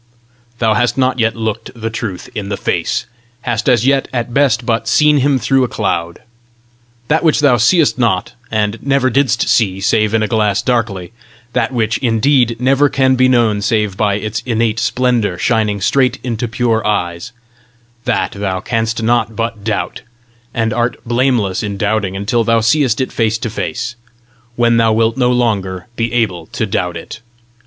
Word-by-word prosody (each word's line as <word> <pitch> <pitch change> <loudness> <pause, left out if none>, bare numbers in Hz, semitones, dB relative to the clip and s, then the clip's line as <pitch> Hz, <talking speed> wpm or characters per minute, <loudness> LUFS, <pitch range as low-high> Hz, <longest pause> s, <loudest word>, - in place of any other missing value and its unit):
Thou 110 -2 +2
hast 120 +4 +1
not 130 -1 +1
yet 115 0 +1
looked 110 0 -3
the 115 0 -3
Truth 110 -5 -5
in 100 -2 -5
the 100 - -2
face, - - -1 0.4
hast 120 0 -1
as 120 -2 +3
yet 135 0 +2
at 120 -1 -3
best 135 -3 +2
but 115 -1 -1
seen 150 +4 +4
him 140 0 +2
through 135 +1 +2
a - - +1
cloud. 85 -7 -3 0.8
That 160 +2 +1
which 160 -3 +3
thou 140 -4 +4
seest 145 - +3
not, 110 -7 0 0.2
and 110 0 -1
never 135 -2 +1
didst 135 -3 +1
see 95 -5 +2
save 110 +2 +1
in 110 - +2
a - - 0
glass 105 -3 +1
darkly 110 -7 -1 0.4
that - - 0
which, 115 -3 0
indeed, 120 0 +2
never 135 +3 +3
can 130 -1 +2
be 130 0 +4
known 115 -5 +2
save 105 -2 0
by 100 0 +1
its 110 +2 -3
innate 115 -2 0
splendour 120 -9 0
shining 105 -1 0
straight 130 +4 +2
into 120 -1 -2
pure 115 -1 0
eyes 90 +1 -2 0.7
that 125 - 0
thou 95 -2 -3
canst 115 +2 -2
not 115 -1 +1
but 115 -2 -3
doubt, 110 -1 -3 0.5
and 115 -1 -1
art 120 +1 -1
blameless 120 -5 +1
in 100 -2 -4
doubting 100 -1 -1
until 105 +4 0
thou 115 0 +2
seest 125 +1 +2
it 130 - -2
face 115 -1 0
to 115 -1 -4
face, 120 +2 -4 0.6
when 120 -1 +3
thou 115 -1 +3
wilt 110 +1 +2
no 125 -2 +2
longer 100 -7 -1
be 115 -1 -1
able 95 -9 -1
to - - -3
doubt - - -2
it. - - -9
115 Hz, 175 wpm, -16 LUFS, 105-125 Hz, 0.8 s, seen